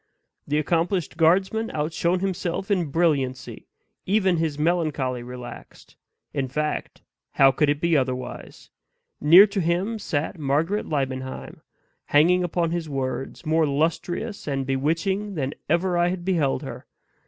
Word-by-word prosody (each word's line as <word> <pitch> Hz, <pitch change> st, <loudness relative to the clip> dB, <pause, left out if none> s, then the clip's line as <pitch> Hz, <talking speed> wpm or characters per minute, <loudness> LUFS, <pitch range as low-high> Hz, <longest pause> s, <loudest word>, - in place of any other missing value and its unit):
The 150 Hz, -, 0 dB
accomplished 170 Hz, +3 st, 0 dB
guardsman 190 Hz, +7 st, +2 dB
outshone 170 Hz, +4 st, 0 dB
himself 190 Hz, 0 st, -2 dB
in 185 Hz, -4 st, +2 dB
brilliancy; 140 Hz, -5 st, -1 dB, 0.4 s
even 190 Hz, -3 st, +2 dB
his 160 Hz, -3 st, -1 dB
melancholy 150 Hz, -6 st, 0 dB
relaxed. 125 Hz, 0 st, -10 dB, 0.4 s
In 135 Hz, -2 st, -1 dB
fact, 150 Hz, +3 st, -3 dB, 0.3 s
how 135 Hz, 0 st, +6 dB
could 145 Hz, +2 st, +1 dB
it 145 Hz, 0 st, +1 dB
be 170 Hz, 0 st, +2 dB
otherwise? 130 Hz, -2 st, -3 dB, 0.5 s
near 170 Hz, +7 st, +9 dB
to 200 Hz, -1 st, -2 dB
him 180 Hz, +7 st, 0 dB
sat 160 Hz, 0 st, -3 dB
Margaret 155 Hz, +8 st, 0 dB
Liebenheim 130 Hz, -3 st, -4 dB, 0.4 s
hanging 175 Hz, +5 st, +4 dB
upon 170 Hz, -1 st, 0 dB
his 170 Hz, -2 st, -3 dB
words 135 Hz, +3 st, -4 dB
more 160 Hz, 0 st, +2 dB
lustrous 170 Hz, +9 st, -2 dB
and 135 Hz, -2 st, -1 dB
bewitching 165 Hz, +10 st, -1 dB
than 140 Hz, -3 st, -2 dB, 0.2 s
ever 175 Hz, +3 st, +1 dB
I 175 Hz, -, +3 dB
had 175 Hz, -1 st, -3 dB
beheld 165 Hz, -8 st, +1 dB
her. -, -, -8 dB
160 Hz, 130 wpm, -24 LUFS, 140-180 Hz, 0.5 s, near